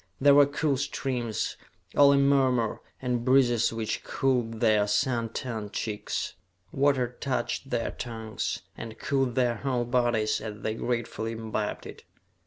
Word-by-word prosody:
There 140 +1 +6
were 145 0 +7
cool 145 -1 0
streams, 125 -4 -2 0.4
all 140 -1 +7
a 140 - +4
murmur, 130 -5 +2 0.2
and 125 -2 0
breezes 120 -3 +4
which 115 -1 -3
cooled 120 -4 0
their 110 -3 +3
sun 115 +1 +1
tanned 110 -3 -5
cheeks. 105 -2 -3 0.4
Water 135 -3 +1
touched 135 0 -2
their 115 - -1
tongues, 110 -3 -4
and 115 0 -8
cooled 135 -2 0
their 120 -3 +2
whole 125 -2 -1
bodies 120 -3 +1
as 105 -1 -7
they 110 - -1
gratefully 115 -1 -2
imbibed 110 -2 -3
it. - - -10
120 Hz, 140 wpm, -28 LUFS, 110-135 Hz, 0.4 s, were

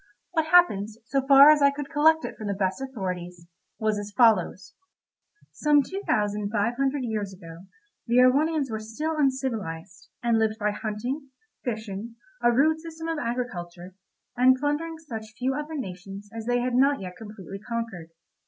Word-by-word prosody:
What 320 -3 0
happened, 315 - +4 0.2
so 275 +3 0
far 280 +1 +9
as 300 -1 +3
I 280 - +6
could 285 0 -6
collect 320 +1 +4
it - - -6
from 215 - -7
the 200 - -1
best 190 +5 -1
authorities, 180 -9 -5 0.3
was 215 -1 0
as 205 0 -6
follows: 205 -5 +3 0.8
Some 295 -1 +3
two 385 +8 -6
thousand 210 -1 0
five 220 +2 0
hundred 270 +1 0
years 215 -4 -3
ago 170 0 -12 0.4
the 235 - +1
Erewhonians 275 +2 +3
were 220 - -3
still 265 +9 -4
uncivilised, 225 - -2
and 235 -1 +2
lived 220 0 +1
by 210 -1 0
hunting, 240 +7 -4 0.3
fishing, 220 -1 -5 0.3
a 240 - +4
rude 310 +6 +3
system 325 0 -7
of 325 -2 -2
agriculture, 185 -8 -5 0.4
and 255 +1 +5
plundering 295 +4 -2
such 225 -9 -8
few 255 +2 0
other 300 +3 -5
nations 195 -2 -8
as 225 0 -7
they 245 0 +2
had 250 0 -1
not 275 +3 +3
yet 180 -2 -7
completely 200 -1 -9
conquered. 225 -7 -5
235 Hz, 165 wpm, -26 LUFS, 205-280 Hz, 0.8 s, far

